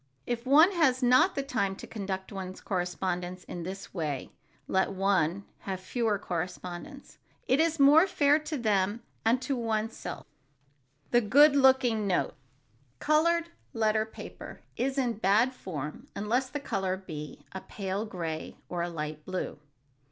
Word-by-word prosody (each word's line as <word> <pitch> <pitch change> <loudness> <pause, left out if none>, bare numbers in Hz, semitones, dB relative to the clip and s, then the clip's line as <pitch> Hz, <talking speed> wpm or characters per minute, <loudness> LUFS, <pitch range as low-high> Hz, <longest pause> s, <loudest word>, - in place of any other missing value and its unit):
If 240 +1 -3
one 310 +7 +7
has 275 -8 +2
not 255 +9 +5
the 275 - -1
time 200 -8 -1
to - - -9
conduct 190 -2 -5
one's 190 -2 -6
correspondence 180 0 -3
in 175 - -7
this 190 +3 -7
way, 150 -7 -3 0.4
let 190 +1 +1
one 195 -1 +1
have 190 -2 -4
fewer 215 +2 0
correspondents. 180 - -6 0.3
It 260 - +3
is 325 -1 +2
more 295 +6 +7
fair 295 -4 +3
to 305 0 -4
them 210 -1 +1 0.2
and 230 +3 +3
to 270 +1 -1
one's 225 -2 -1
self. - - -7
[Sidenote: 140 0 -40
THE 240 - +5
GOOD 290 +4 +7
LOOKING 260 -6 +4
NOTE] 185 - +1 0.6
Colored 335 - +2 0.2
letter 220 -1 +1
paper - - -10
is 265 +2 -1
in 240 -5 0
bad 220 +6 +3
form 180 - -6
unless 240 +6 0
the 290 - -4
color 195 -8 -2
be 155 -6 -8
a 190 - -6
pale 195 0 -4
gray 165 -5 -5
or 175 -1 -2
a 175 - -1
light 155 -2 -5
blue. 185 -3 -4
205 Hz, 150 wpm, -29 LUFS, 180-260 Hz, 0.6 s, one